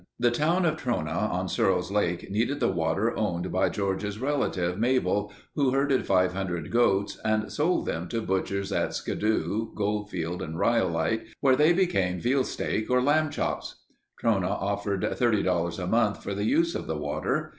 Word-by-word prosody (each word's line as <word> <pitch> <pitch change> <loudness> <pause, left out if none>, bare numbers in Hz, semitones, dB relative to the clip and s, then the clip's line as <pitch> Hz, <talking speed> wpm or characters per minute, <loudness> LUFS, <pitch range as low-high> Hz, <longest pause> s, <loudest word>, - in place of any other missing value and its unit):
The 120 0 +3
town 165 +8 +2
of 160 -1 +1
Trona 120 - -2
on - - -2
Searles' 90 0 +1
Lake 90 -3 -1
needed 120 +8 0
the 120 - +2
water 90 +6 0
owned 90 -4 -2
by 95 - +2
George's 100 +1 -2
relative, 105 -9 -1
Mabel, 105 -4 +1 0.2
who 140 -3 +2
herded 135 0 +1
500 90 -2 0
goats 100 -4 +2
and 110 -1 0
sold 165 +5 +1
them 80 +2 -3
to 115 - -2
butchers 100 -1 -2
at - - 0
Skidoo, 110 +1 -1
Goldfield, 100 -5 -2
and 80 +1 -5
Rhyolite 95 -1 +1
where 130 -2 +4
they 150 +4 +5
became 100 - +1
veal 130 +6 +2
steak 110 -3 -2
or 125 0 +4
lamb 150 +4 +2
chops. - - -3 0.5
Trona 95 -6 +2
offered 100 -1 -2
$30 90 -8 +1
a 90 - -3
month 110 +1 +1
for 100 - -3
the 100 - -2
use 335 +6 +2
of - - -4
the - - -2
water. - - -2
105 Hz, 165 wpm, -27 LUFS, 90-125 Hz, 0.5 s, they